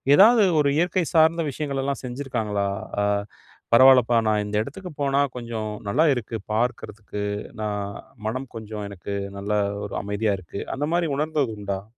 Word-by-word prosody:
ஏதாவது 220 +3 +7 0.2
ஒரு 140 -1 +3
இயற்கை 175 +1 +1
சார்ந்த 160 +1 +5
விஷயங்கள்லாம் 140 -1 -3
செஞ்சிருக்காங்களா? 120 -6 -2 0.3
ஆ - - +2 0.7
பரவால்லப்பா, 125 -1 +7
நான் 105 -1 +2
இந்த 105 0 -4
இடத்துக்கு 180 +6 -8
போனா 140 0 +2
கொஞ்சம் 115 -3 -4 0.2
நல்லா 150 +11 +3
இருக்கு, 115 -2 -4 0.2
பார்க்கறதுக்கு, 105 -3 -2 0.4
நான் 105 -1 -2 0.4
மனம் 130 +4 -3
கொஞ்சம் 105 -2 -6
எனக்கு 100 +1 -6 0.2
நல்லா, 105 +1 0 0.3
ஒரு - - -6
அமைதியா 100 +1 0
இருக்கு. 90 +2 -7
அந்த 145 +2 -1
மாரி 170 -2 +1
உணர்ந்தது 150 -5 0
உண்டா? 100 -1 -3
120 Hz, 140 wpm, -24 LUFS, 105-145 Hz, 0.7 s, ஏதாவது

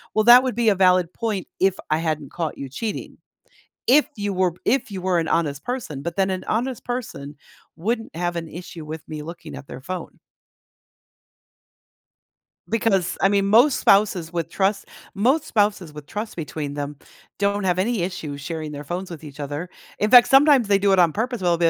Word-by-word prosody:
"Well, 215 - +3
that 240 +1 +9
would 255 -4 -2
be 235 -1 +3
a 205 - +3
valid 180 -2 +3
point 215 -5 -3
if 190 0 +3 0.2
I 155 - +3
hadn't 155 -4 -3
caught 165 -3 -4
you 140 - -6
cheating. 210 - -5 0.7
If 290 +4 +6
you 205 -1 -2
were 185 -2 +1
if 250 -3 +1
you 190 -2 -5
were 185 -1 +1
an 165 - -2
honest 150 -4 0
person 240 - -4
but 170 +5 -5
then 190 0 +2
an 185 -1 -3
honest 245 +3 -2
person 220 - -5 0.4
wouldn't 225 +6 -2
have 175 0 -1
an 165 -1 -4
issue 170 -1 -9
with 155 0 -6
me 155 -1 -6
looking 170 -1 -9
at 140 - -10
their 130 - -9
phone." 185 +5 -7 2.5
Because, 200 -5 +1
I 195 - +5
mean, 200 -1 +2
most 240 +7 +5
spouses 195 -5 +3
with 170 -2 -3
trust 195 +3 0 0.3
most 265 +10 +2
spouses 200 -7 0
with 150 -1 -10
trust 210 +7 -5
between 150 -3 -5
them 145 0 -4 0.4
don't 200 0 +1
have 185 -1 +1
any 220 0 0
issue 160 -6 -4
sharing 155 +1 -5
their 145 0 -7
phones 180 +5 -5
with 160 -2 -9
each 145 -1 -11
other. 145 +4 -4 0.3
In 210 - 0
fact, 245 -1 +9
sometimes 270 -4 +5
they 200 -1 +4
do 195 0 +2
it 190 - +4
on 170 -2 +5
purpose, 230 +4 -3
well, 175 -2 +2
they'll 165 0 +3
185 Hz, 195 wpm, -23 LUFS, 160-215 Hz, 2.5 s, that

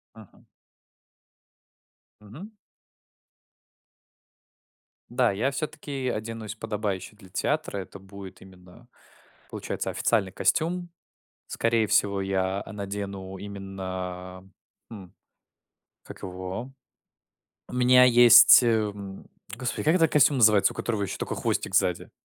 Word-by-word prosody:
Мгм. 110 -4 -17 1.8
Мгм. 130 - -12 2.6
Да, 120 -1 +1
я 115 +8 -1
всё-таки 140 -2 -5
оденусь 110 -1 -5
подобающе 105 -3 -4
для 100 -3 -17
театра. 100 - -2
Это 95 0 -8
будет 95 0 -12
именно, 95 +5 -17 0.6
получается, - - -4
официальный 100 -5 0
костюм. 175 - 0 0.6
Скорее 115 -1 0
всего, 100 -1 +1
я, 95 0 -1
а, - - -11
надену 100 -1 -6
именно, 95 -2 -7 0.4
м, 95 -4 -11 0.9
как - - -13
его? 95 +7 -6 1.0
У - - -9
меня 125 0 +5
есть, 120 0 +8
э, 120 - +1
м, 105 -3 -3 0.3
господи, 125 +1 -4
как 155 +4 +3
этот 165 -3 +3
костюм 145 -1 +4
называется, 105 -3 +5
у - - -17
которого 110 -4 -2
еще 100 - -4
только - - -4
хвостик - - -2
сзади? - - +1
105 Hz, 110 wpm, -26 LUFS, 95-120 Hz, 2.6 s, есть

